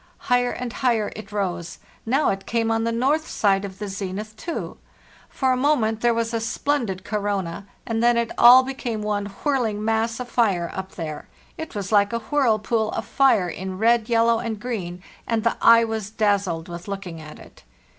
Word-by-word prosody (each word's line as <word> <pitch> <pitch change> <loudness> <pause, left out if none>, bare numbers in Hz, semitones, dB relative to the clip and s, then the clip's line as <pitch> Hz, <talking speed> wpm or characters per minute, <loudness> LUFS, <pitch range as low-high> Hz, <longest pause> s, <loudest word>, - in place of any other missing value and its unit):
Higher 245 -1 +1
and 245 -1 -5
higher 235 -5 0
it 215 -1 -9
rose; 185 -4 -3 0.3
now 270 +6 +2
it 195 0 -5
came 230 -1 0
on 225 0 0
the 230 - 0
north 275 +7 +1
side 195 -2 +1
of 190 -2 -7
the 210 +1 -5
zenith 200 +2 -5
too; 335 +9 -6 0.5
for 265 -1 0
a - - +3
moment 250 -5 +1
there 240 - +4
was 230 0 -1
a 230 - 0
splendid 225 -4 -2
corona, 200 -4 -3 0.2
and 225 -1 -1
then 240 0 +4
it 235 -1 0
all 250 +2 +8
became 245 -5 -4
one 205 -1 -1 0.2
whirling 230 -8 0
mass 225 +1 0
of 250 - -5
fire 200 -9 +1
up 190 0 -6
there; 155 -3 -6 0.3
it 320 -6 -7
was 200 -1 -4
like 205 -1 +4
a - - +1
whirlpool 225 -3 +1
of - - -3
fire 265 -9 +3
in 185 +2 -5
red, 230 +1 +2
yellow, 230 0 +3
and 225 -3 -4
green, 185 -7 -5 0.2
and 225 -2 0
the 230 - +1
eye 230 0 +7
was 220 -3 -3
dazzled 200 -6 0
with 175 +1 -8
looking 195 -5 -6
at 155 -1 -11
it. - - -16
220 Hz, 190 wpm, -23 LUFS, 200-235 Hz, 0.5 s, all